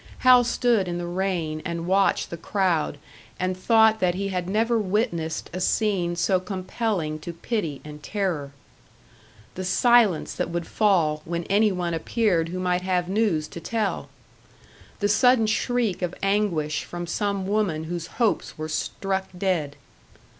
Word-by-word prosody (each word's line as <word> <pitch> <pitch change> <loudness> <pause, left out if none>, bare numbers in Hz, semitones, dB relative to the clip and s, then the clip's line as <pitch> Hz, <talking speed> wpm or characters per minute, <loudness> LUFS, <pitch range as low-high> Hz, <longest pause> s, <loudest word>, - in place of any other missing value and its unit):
Hal 250 -1 +8
stood 240 -4 +1
in 175 0 -3
the 175 - -4
rain 175 -4 -2
and 170 0 -4
watched 195 +2 +2
the - - -3
crowd 170 -4 0 0.4
and 185 0 0
thought 220 +3 +4
that 180 -2 +1
he 195 +1 -2
had 180 -1 -3
never 225 +3 +2
witnessed 185 -6 -1
a 185 - -4
scene 185 -5 +1
so 185 +2 +2
compelling 185 -3 -3
to 165 +3 -6
pity 165 - -3
and 150 0 -9
terror. 175 -8 -2 1.0
The 185 - -5
silence 220 -2 +3
that - - -2
would 170 0 -3
fall 170 -8 +2
when 170 +1 -3
any 205 +4 +3
one 175 -2 -2
appeared 170 -1 +1
who 180 - -4
might 180 -1 0
have 180 -1 0
news 195 -7 +1
to - - -8
tell! 215 +3 -2 0.9
The 205 - +3
sudden 235 +3 +4
shriek 225 -2 0
of 180 -1 -2
anguish 170 -8 0
from 175 0 -6
some 200 +2 -2
woman 195 -6 0
whose 170 +1 -4
hopes 230 -4 0
were 155 0 -5
struck 190 +4 -2
dead! 175 -7 -1
185 Hz, 155 wpm, -25 LUFS, 170-210 Hz, 1.0 s, Hal